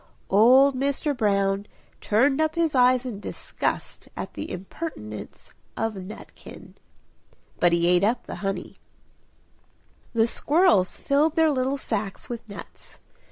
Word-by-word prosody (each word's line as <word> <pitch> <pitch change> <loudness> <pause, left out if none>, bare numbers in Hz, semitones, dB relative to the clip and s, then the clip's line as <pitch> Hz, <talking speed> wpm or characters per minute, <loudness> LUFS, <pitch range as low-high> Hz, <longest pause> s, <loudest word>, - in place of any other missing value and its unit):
Old 255 +7 +6
Mr. 280 +2 0
Brown 200 -3 +1 0.3
turned 270 +7 +2
up 315 0 0
his 330 -2 +1
eyes 255 0 +4
in 230 -6 -5
disgust - - -4
at - - -5
the - - -6
impertinence 180 - -8 0.2
of 225 0 -1
Nutkin. 195 +2 -11 0.9
But 175 - +4
he 170 0 +2
ate 180 +1 +4
up 235 +4 +1
the - - -7
honey! 195 -1 -4 1.4
The 225 -1 +3
squirrels 235 - +2
filled 295 +3 +1
their 320 -2 +4
little 265 0 0
sacks 210 -6 -4
with 235 -2 -7
nuts. 200 - -10
235 Hz, 125 wpm, -25 LUFS, 195-280 Hz, 1.4 s, Old